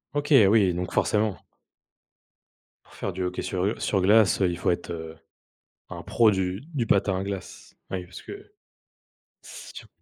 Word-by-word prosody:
OK! 145 +1 0 0.2
Oui! 100 -4 +4
Donc 90 +1 -4
forcément. 105 -2 +1 1.5
Pour - - -20
faire 95 - -4
du 95 +1 -3
hockey 90 0 -3
sur, 90 -1 -2
heu, 105 - 0
sur 95 -3 0
glace, 105 0 +4
heu, 95 - +3
il 85 - -4
faut - - -1
être, 85 - -4
heu, 80 -1 -7 0.7
un - - -8
pro 115 -2 +3
du 95 +1 -2
du 120 -5 -1
patin 100 -2 +2
à - - -3
glace. 100 -2 -7 0.2
Ouais, 90 -1 -3
parce 90 - -12
que 405 0 -11 0.9
c'est - - -12
dur. - - -10
95 Hz, 175 wpm, -25 LUFS, 90-105 Hz, 1.5 s, Oui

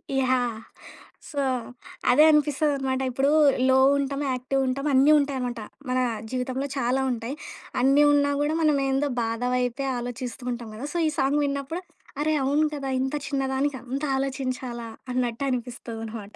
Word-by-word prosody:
ఇ - - +1
yeah! 250 -3 +1 0.7
So 285 - -4 0.7
అదే 295 +5 +6
అనిపిస్తదన్నమాట. 285 -3 +1
ఇప్పుడు 270 +3 +2 0.4
లో 260 - +5 0.2
ఉంటం. 280 0 -2
యాక్టివ్ 255 +2 -1
ఉంటాం. 275 +3 -2
అన్నీ 270 +3 +6
ఉంటాయన్నమాట. 255 -4 -2 0.3
మన 255 0 +1 0.3
జీవితంలో 260 +2 -2
చాలా 260 +1 +1
ఉంటాయి. 240 +3 -4 0.5
అన్నీ 275 +3 +5
ఉన్నా 285 0 +3
కూడా 295 +2 +1
మనం 305 -2 +3
ఏందో 270 +2 +1 0.2
బాధ 230 +1 -3
వైపే 250 +2 -1
ఆలోచిస్తూ 245 +1 -5
ఉంటాం 235 -2 -5
కద! 225 - -8
సో 345 - 0
ఈ - - +2
సాంగ్ 275 +2 +2
విన్నప్పుడు 280 +5 -3 0.4
అరే 310 +1 +1
అవును 290 +3 +2
కదా! 275 -2 -4
ఇంత 265 +3 -1
చిన్న 275 -2 -1
దానికి 270 +1 0
అంత 265 +3 -4
ఆలోచించాలా 255 -3 -3 0.3
అన్నట్టు 245 +1 -1
అనిపిస్తది 240 -2 -4
అన్నమాట. 215 -2 -8
265 Hz, 150 wpm, -25 LUFS, 245-280 Hz, 0.7 s, అదే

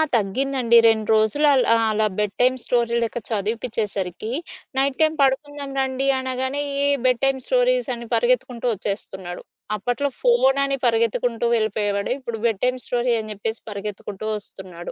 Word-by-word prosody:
తగ్గిందండి. 235 +3 +2
2 220 -2 +2
రోజులు 220 +8 +3
అలా 255 -4 +4 0.2
అలా 215 0 +2
బెడ్ 210 -1 -1
టైమ్ 255 +1 +4
స్టోరీ 235 -1 +1
లెక్క 230 - -3
చదివిపచ్చేసరికి. 215 -2 -2 0.5
నైట్ 270 0 +1
టైమ్ 315 0 +3
పడుకుందాం 280 +1 -1
రండి 265 +1 -1
అనగానే. 260 +2 -2 0.2
ఏ - - +3 0.2
బెడ్ 250 -2 +2
టైమ్ 270 -1 +1
స్టోరీస్ - - +2
అని 235 0 -9
పరిగెత్తుకుంటూ 370 - 0
వచ్చేస్తున్నాడు. 190 -3 -5 0.3
అప్పట్లో 245 +7 -1
ఫోను 475 - +4
అని 275 0 -1
పరిగెత్తుకుంటూ 230 0 +1
వెళ్ళిపోయేవాడు. 210 -2 -1
ఇప్పుడు 235 -4 -5
బెడ్ 225 -4 0
టైమ్ 255 0 0
స్టోరీ 245 0 +1
అని 215 0 -7
జెప్పేసి 220 +2 -4
పరిగెత్తుకుంటూ 205 0 -6
వస్తున్నాడు. 185 -4 -8
235 Hz, 140 wpm, -22 LUFS, 215-265 Hz, 0.5 s, అలా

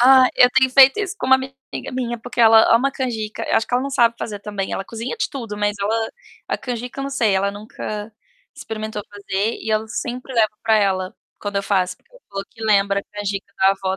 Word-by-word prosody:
Ah, 260 +1 +7
eu 250 - +7
tenho 260 0 +4
feito 270 +7 +7
isso 400 -3 -3
com - - -4
uma 265 - +7
amiga 265 0 -7 0.4
minha, 240 -2 -3
porque 245 +2 -4
ela 225 0 +7
ama 260 +4 +3
canjica. 225 -6 -4
Acho 225 - +2
que - - -14
ela 250 - +2
não 275 - -3
sabe 235 -4 +3
fazer, 205 -2 -5
também, 200 -2 -4
ela 195 - -3
cozinha 230 - -5
de - - -1
tudo, 230 -8 -6
mas 205 0 0
ela, 220 +2 0 0.4
a - - -1
canjica 245 +1 -5
eu - - -2
não 275 - -4
sei, 230 -8 +2
ela 195 +1 +1
nunca 210 +1 -7 0.4
experimentou 215 -1 -5
fazer 205 +2 -2
e 220 - -6
eu 215 0 +1
sempre 250 +3 -5
levo 220 -2 +3
pra 220 -1 +4
ela 190 -2 0 0.2
quando 205 -1 -4
eu 200 - +1
faço, 185 -2 0
porque - - -37
ela - - -18
falou 195 0 -5
que 225 - -13
lembra 200 -2 +3
a - - -19
canjica 200 -1 -4
da 190 0 +5
avó 190 -1 -2
220 Hz, 230 wpm, -21 LUFS, 205-250 Hz, 0.4 s, Ah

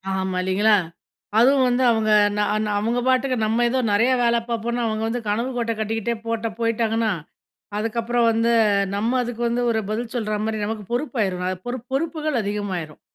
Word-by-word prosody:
ஆமா. 190 -1 -2
இல்லைங்களா? 205 +3 +3 0.6
அதுவும் 260 +2 +5
வந்து 250 +1 +1
அவுங்க 220 -1 +1 0.3
நா 210 - +2 0.2
நா 210 - -2
அவுங்க 230 +3 0
பாட்டுக்க 255 0 +2
நம்ம 230 +3 +1
ஏதோ 260 +1 0
நிறைய 235 +5 +3
வேல 235 0 +3
பாப்போன்னு 235 +1 -1
அவுங்க 220 0 -1
வந்து 240 +1 -2
கனவு 230 +5 0
கோட்டை 230 -1 -1
கட்டிக்கிட்டே 225 +1 -1
போட்ட 230 0 -1
போயிட்டாங்கன்னா. 225 -1 +1 0.7
அதுக்கப்புறம் 230 +2 0
வந்து 230 +1 +2 0.4
நம்ம 230 +5 0
அதுக்கு 240 0 -5
வந்து 240 +1 0
ஒரு 220 - +1
பதில் 230 +2 -3
சொல்றமாரி, 215 -1 -1
நமக்கு 215 -1 -4
பொறுப்பாயிரும். 220 -9 -1 0.2
பொறு 245 +1 -3
பொறுப்புகள் 310 0 -1
அதிகமாயிரும். 195 -7 -4
230 Hz, 155 wpm, -22 LUFS, 215-245 Hz, 0.7 s, அதுவும்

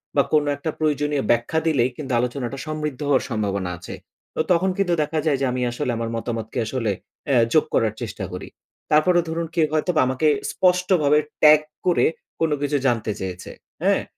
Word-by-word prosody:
বা 140 - +6
কোনো 150 -1 +3
একটা 145 +3 -4
প্রয়োজনীয় 150 -3 0
ব্যাখ্যা 120 +7 +1
দিলেই 130 -6 +2
কিন্তু, 140 -3 -6
আলোচনাটা 125 +1 -3
সমৃদ্ধ 150 -3 -3
হওয়ার 135 -3 +3
সম্ভাবনা 100 -5 -2
আছে। 90 - -9 0.4
তো - - +1
তখন 180 +2 +3
কিন্তু 195 -3 +1
দেখা 155 +1 -2
যায় 145 -4 +2
যে - - +2
আমি 125 0 -2
আসলে 120 +1 -2
আমার 115 0 -3
মতামতকে 115 -1 -4
আসলে, 115 -2 -1 0.4
এ - - +4 0.2
যোগ 155 - +4
করার 110 -2 +2
চেষ্টা - - -5
করি। - - -6 0.4
তারপরেও 175 +3 +4
ধরুন 165 +1 -2
কেউ 160 - +4
হয়তো 155 +3 +1 0.2
আমাকে 130 +4 +1 0.2
স্পষ্টভাবে 180 -5 +3 0.2
ট্যাগ 150 0 +8 0.2
করে, 180 -2 +3 0.3
কোন 165 - +2
কিছু 145 0 +1
জানতে 115 -3 0
চেয়েছে, 95 -1 -6 0.3
হ্যাঁ? - - +2
145 Hz, 175 wpm, -22 LUFS, 120-155 Hz, 0.4 s, ট্যাগ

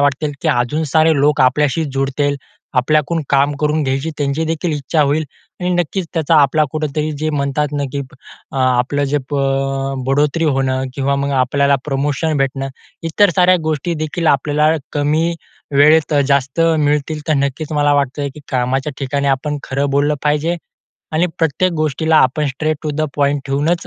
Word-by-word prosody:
वाटत, 145 +1 +1 0.2
की - - +1
अजून 125 +6 +1
सारे 160 0 +5
लोक 150 0 +2
आपल्याशी 145 +4 +2
जुळतील. 140 +1 0 0.4
आपल्याकडून 155 +5 +1
काम 140 +1 +3
करून 150 +1 +1
घ्यायची 135 +4 -1
त्यांची 145 +3 -1
देखील 165 +1 -1
इच्छा 150 +2 -1
होईल. 150 +2 +1 0.4
आणि 180 0 -1
नक्कीच 175 +1 -1
त्याचा 160 -1 +2
आपला 150 +3 +3
कुठेतरी 155 0 -2
जे 155 0 -1
म्हणतात 145 0 -1
ना, 145 - -1
की 140 - -2 0.5
अ, - - -6
आपलं 130 +2 +1
जे 145 - +3
प - - -2
अ, 135 0 -1
बढोतरी 145 +4 +1
होणं 135 -2 0
किंवा 140 0 0
मग 140 0 -1
आपल्याला 140 +2 +2
प्रमोशन 145 +2 -1
भेटणं. 135 0 -1 0.3
इतर 175 +4 +3
साऱ्या 180 0 +5
गोष्टी 155 +2 -1
देखील 155 +2 -3
आपल्याला 150 +2 +3 0.2
कमी 155 +3 +1 0.4
वेळेत 150 +2 +5
अ, 145 - +3
जास्त 140 +2 +1 0.2
मिळतील. 150 +1 0
तर 155 - +3
नक्कीच 145 +3 -4
मला 145 -1 +2
वाटतं, 140 +1 -1
की 150 - -11
कामाच्या 130 +3 0
ठिकाणी 140 +1 -2
आपण 145 +2 -1
खरं 140 +2 -2
बोललं 145 +2 +2
पाहिजे. 150 +3 +1 0.6
आणि 165 +3 +2
प्रत्येक 170 +3 +1
गोष्टीला 155 0 +1
आपण 145 +4 +2
स्ट्रेट 155 +3 -1
टू 155 - -2
द 155 - -1
पॉईंट 145 0 +1
ठेवूनच, 150 +5 0
145 Hz, 165 wpm, -17 LUFS, 140-155 Hz, 0.6 s, सारे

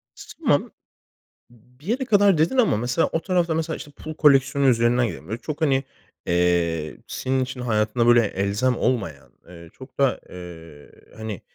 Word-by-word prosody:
T - - -11 0.2
tamam. - - +2 0.8
B 125 +2 -25
bir 155 - -16
yere 255 +4 -1
kadar 205 -6 +4
dedin 165 +12 +1
ama 220 - +3
mesela, 120 +7 0
o 165 - -1
tarafta 175 -3 0
mesela 160 0 -2
işte 145 - -10
pul 155 +2 -9
koleksiyonu 140 -2 +3
üzerinden 120 0 +2
gidelim. 80 - -8
Böyle 110 +4 -5
çok 155 +1 -6
hani, 135 -3 +2 0.4
eee, 85 -3 0
senin 130 0 -2
için 125 0 -7
hayatında 115 0 0
böyle 120 -1 +6
elzem 105 +6 -1
olmayan, 95 - -2 0.2
eee, 85 -1 -13
çok 130 +1 -14
da, 135 -4 +2
eee, 85 -4 -11 0.3
hani 110 -3 -6
125 Hz, 165 wpm, -23 LUFS, 100-150 Hz, 0.8 s, böyle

